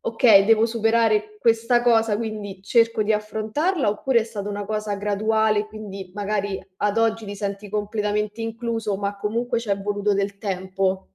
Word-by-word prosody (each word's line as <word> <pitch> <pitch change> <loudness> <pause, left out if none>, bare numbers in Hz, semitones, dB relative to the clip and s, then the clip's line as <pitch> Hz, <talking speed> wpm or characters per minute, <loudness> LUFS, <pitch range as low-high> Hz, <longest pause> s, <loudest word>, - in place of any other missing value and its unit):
"Okay, 225 -4 +5
devo 225 +1 +4
superare 225 -2 +1
questa 230 +2 +2
cosa, 225 -3 +3
quindi 210 -3 -5
cerco 230 +1 +3
di 215 +1 +1
affrontarla", 220 - -1
oppure 235 +4 +2
è - - -2
stata 210 -3 -6
una 205 0 -4
cosa 215 -1 -2
graduale, 215 +1 +1
quindi 200 -3 -8
magari 205 -1 -2 0.2
ad 205 +1 0
oggi 225 0 +1
ti 205 0 -6
senti 200 0 -5
completamente 210 +1 -2
incluso, 225 -2 -2
ma 200 0 -3
comunque 230 +4 -1
c'è 205 -4 -2
voluto 205 +1 0
del 200 0 -1
tempo? 190 -1 -2
210 Hz, 155 wpm, -23 LUFS, 205-225 Hz, 0.2 s, Okay